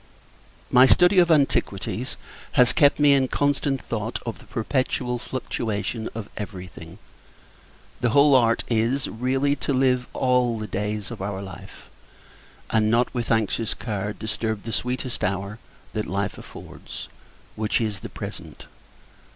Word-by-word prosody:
My 130 +1 +7
study 180 +6 +6
of 175 -1 +5
antiquities, 150 -4 +1 0.4
has 125 -3 +5
kept 145 0 +4
me 145 -1 +6
in 135 -1 +3
constant 140 0 0
thought 110 0 -3
of 115 - -5
the - - -16
perpetual 125 +1 -1
fluctuation 115 -3 -3
of 110 -3 -5
every 100 -3 -6
thing. 85 0 -12 1.0
The 125 - +1
whole 140 +4 +5
art 115 -3 +4
is, 120 +4 +1
really, 135 +5 0
to 140 - -1
live 130 -1 +2
all 125 -2 +2
the 110 - -4
days 105 0 -3
of - - -7
our 95 0 -3
life; 95 0 -10 0.8
and 110 -1 +3
not, 120 +2 +2
with 120 -3 -3
anxious 110 0 +1
care, 105 -3 -3
disturb 110 0 -3
the 115 - -5
sweetest 125 0 -3
hour 100 +3 -2 0.3
that 105 -1 -2
life 100 +1 -2
affords - - -10 0.5
which 110 0 0
is, 110 -4 -2
the - - -8
present! - - -8
115 Hz, 145 wpm, -24 LUFS, 105-130 Hz, 1.0 s, My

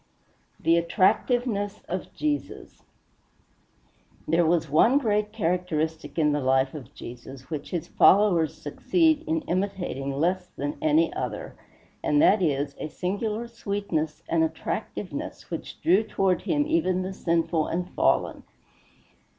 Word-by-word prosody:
XVI - - -24
THE 165 +1 +4
ATTRACTIVENESS 205 +4 +1
OF 185 +1 -4
JESUS 300 -1 -3 1.5
There 165 +1 +3
was 165 -1 +2
one 165 - +4
great 210 -5 +1
characteristic 165 -6 -2
in 150 -2 +3
the 145 - +1
life 130 +1 +2
of 140 -4 -9
Jesus 125 +2 -10
which 150 -2 -4
his 170 -4 -3
followers 175 -6 +4
succeed 315 - +1
in 320 0 0
imitating 185 - -2
less 180 +6 0
than 145 +2 -3
any 155 +2 +3
other, 120 -5 -4 0.5
and 145 - +2
that 200 +6 +5
is 145 -4 0
a - - -3
singular 210 +7 -3
sweetness 200 -9 -3
and 165 -1 +2
attractiveness 160 - -4
which - - -6
drew 185 +5 +5
toward 195 -4 0
him 295 -2 +1
even 300 - +1
the 190 +1 -4
sinful 165 -3 0
and 180 +2 -3
fallen. - - +1
175 Hz, 130 wpm, -26 LUFS, 155-205 Hz, 1.5 s, that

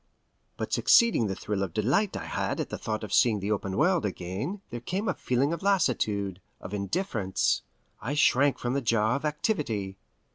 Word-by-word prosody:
But - - -4
succeeding 230 - +5
the 95 - -2
thrill 100 0 -3
of 95 -4 -3
delight 140 - +1
I - - -6
had - - -2
at - - -2
thought 110 0 -3
of 105 - -5
seeing 110 -4 +4
the 100 +2 -2
open 100 -2 -2
world 175 +2 +3
again 100 - -4
there 120 - -4
came 190 - -3
a - - +2
feeling 135 +5 0
of 170 - -4
lassitude, 105 - +1 0.2
of 95 - -8
indifference; 105 - 0 0.4
I 130 +7 -3
shrank 145 -1 +4
from 120 0 -2
the 140 - 0
jar 115 -1 +2
of 140 - -3
activity. 145 - -2
120 Hz, 180 wpm, -28 LUFS, 100-150 Hz, 0.4 s, succeeding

